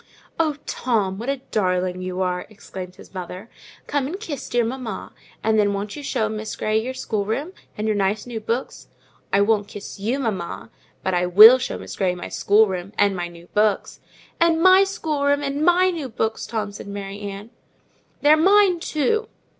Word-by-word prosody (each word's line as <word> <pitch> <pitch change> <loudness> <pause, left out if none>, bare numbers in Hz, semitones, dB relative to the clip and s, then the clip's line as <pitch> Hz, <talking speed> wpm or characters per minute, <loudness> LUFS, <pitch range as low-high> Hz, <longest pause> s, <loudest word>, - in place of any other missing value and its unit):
"Oh, 315 -3 +2
Tom, 205 -6 -1
what 235 +4 -4
a 275 -2 -2
darling 185 -2 0
you 185 0 -3
are!" 180 0 -2
exclaimed 185 -3 -9
his - - -15
mother. 185 +3 -7 0.3
"Come 280 -2 -1
and 365 +7 -5
kiss 315 - -6
dear 240 -1 +2
mamma; 235 -4 -5 0.3
and 220 0 +3
then 205 -1 +3
won't 200 +1 -4
you 295 - -7
show 220 -6 -1
Miss 215 0 -5
Grey 215 0 0
your 260 +3 -5
schoolroom, 220 - -2 0.2
and 210 - -2
your 215 - +1
nice 200 +1 0
new 240 -2 -5
books?" 230 +4 -4 0.4
"I 200 - +4
won't 205 -1 +2
kiss 205 0 -9
you, 225 +7 -1
mamma; 210 -10 -4 0.3
but 190 - 0
I 180 0 +1
will 215 +8 +9
show - - -3
Miss - - -8
Grey 185 -2 0
my 175 - -7
schoolroom, 200 -2 +2
and 200 -1 +3
my 175 -1 -3
new 170 0 -13
books." 210 -1 +1 0.4
"And 335 -1 +3
my 375 +3 +7
schoolroom, 290 -6 0
and 280 +2 -2
my 360 +2 +4
new 310 -7 -5
books, 220 -1 -2
Tom," 215 -2 -3
said 200 - -9
Mary 200 0 -6
Ann. 205 +2 -7 0.7
"They're 295 +1 +7
mine 385 +1 +5
too." 435 +9 0
220 Hz, 185 wpm, -22 LUFS, 195-280 Hz, 0.7 s, will